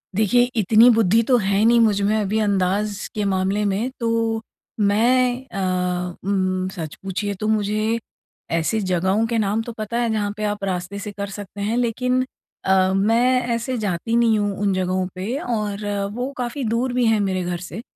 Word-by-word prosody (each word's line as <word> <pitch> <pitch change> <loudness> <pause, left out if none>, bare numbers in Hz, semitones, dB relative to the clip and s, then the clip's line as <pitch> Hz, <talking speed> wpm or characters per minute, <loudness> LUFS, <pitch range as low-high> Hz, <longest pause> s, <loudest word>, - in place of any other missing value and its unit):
देखिए, 220 +4 +4
इतनी 220 +3 +6
बुद्धि 225 -2 +4
तो 250 +3 +3
है 200 -1 +1
नहीं 235 +1 +5
मुझ 210 -3 +3
में 205 +2 +2
अभी 215 +1 0
अंदाज़ 200 0 0
के 210 - -1
मामले 195 +1 0
में 205 +5 0
तो 230 -1 0 0.4
मैं 245 +5 +2
अ, 180 -4 -2
उम, 185 -1 0
सच 160 -5 -6
पूछिए 195 +2 -2
तो 215 - -2
मुझे 215 +1 0 0.5
ऐसी 165 +7 +1
जगहों 190 +3 +1
के 230 0 -1
नाम 210 +1 +1
तो 235 - -6
पता 215 +2 -3
है 240 -1 +1
जहाँ 205 -2 -1
पे 215 - -4
आप 205 -1 -2
रास्ते 185 +1 -3
से 210 0 -6
कर 200 0 -5
सकते 200 0 -8
हैं 215 +4 0
लेकिन 250 +2 +1 0.4
अ, 190 0 +3
मैं 235 +6 +3
ऐसे 245 +2 -3
जाती 210 +1 -1
नहीं 230 -2 +3
हूँ 205 0 0
उन 200 -1 +2
जगहों 185 0 0
पे 205 +9 -3
और 210 -5 -3 0.3
वो 250 +4 -3
काफ़ी 250 +3 -3
दूर 245 +2 0
भी 250 -1 +2
हैं 225 -1 +3
मेरे 190 -2 0
घर 175 0 -2
से, 185 +5 -7
210 Hz, 185 wpm, -22 LUFS, 190-230 Hz, 0.5 s, इतनी